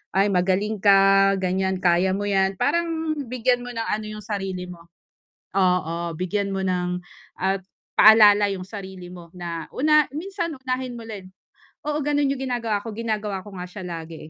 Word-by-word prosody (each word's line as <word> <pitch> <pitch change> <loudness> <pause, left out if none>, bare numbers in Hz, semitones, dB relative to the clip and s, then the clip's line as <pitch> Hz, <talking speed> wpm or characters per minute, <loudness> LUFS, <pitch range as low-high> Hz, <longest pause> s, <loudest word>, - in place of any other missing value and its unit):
"Ay, 200 +1 +3
magaling 195 +4 +1
ka," 195 0 +5
ganyan, 190 0 0
"kaya 180 +2 +3
mo 205 - -3
yan." 195 -1 +1
parang 330 - 0 0.2
bigyan 245 0 +1
mo 245 - -7
ng 225 -1 -3
ano 215 0 -2
yung 215 0 -8
sarili 195 -3 -4
mo. 170 -2 -11 0.7
Oo, 170 -3 +1
bigyan 195 +4 -2
mo 195 - -2
ng 180 -1 -1 0.4
at 190 0 0 0.3
paalala 210 -2 +7
yung 185 -1 -5
sarili 190 -3 -8
mo 175 -2 -12
na, 170 -3 -6
una 305 +2 +4
minsan, 345 +3 -4
unahin 255 -3 -4
mo - - -9
rin. 195 -4 -9 0.6
Oo, 300 0 0
ganun 290 0 +1
yung 275 -1 -2
ginagawa 235 -5 -1
ko, 225 - -6
ginagawa 215 -2 -3
ko 205 - -11
nga 180 - -6
siya 185 +1 -9
lagi, 165 -1 -7
195 Hz, 170 wpm, -23 LUFS, 185-230 Hz, 0.7 s, paalala